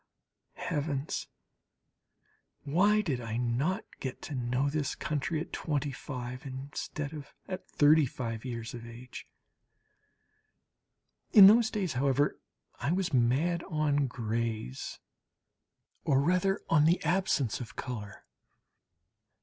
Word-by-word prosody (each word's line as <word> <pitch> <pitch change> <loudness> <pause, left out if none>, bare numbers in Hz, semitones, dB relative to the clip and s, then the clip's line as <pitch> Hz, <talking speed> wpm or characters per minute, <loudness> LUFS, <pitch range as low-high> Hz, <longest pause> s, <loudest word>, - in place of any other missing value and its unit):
Heavens! 145 -3 -2 1.4
why 200 +9 +3
did 140 -11 -2
I 115 -1 -3
not 130 - 0
get 130 -2 -5
to 150 - -6
know 125 +1 0
this 145 0 -1
country 155 +2 -2
at 160 - -6
25 130 -4 -3
instead 140 +2 -5
of 150 -2 -9
at 185 -1 -6
35 130 -7 +2
years 115 -3 -5
of 120 -1 -7
age! 120 +2 -10 2.1
In 200 -3 +11
those 220 +3 +7
days, 190 -8 -2
however, 135 +2 +1 0.4
I 140 +6 0
was 180 -3 0
mad 135 +8 +2
on 150 -4 +1
grays, 115 - -3 1.0
or 135 -2 +3
rather 180 +6 +2
on 150 -2 +4
the 170 +3 +4
absence 170 - +1
of 120 - -8
colour. 105 -6 -6
140 Hz, 110 wpm, -30 LUFS, 125-160 Hz, 2.1 s, In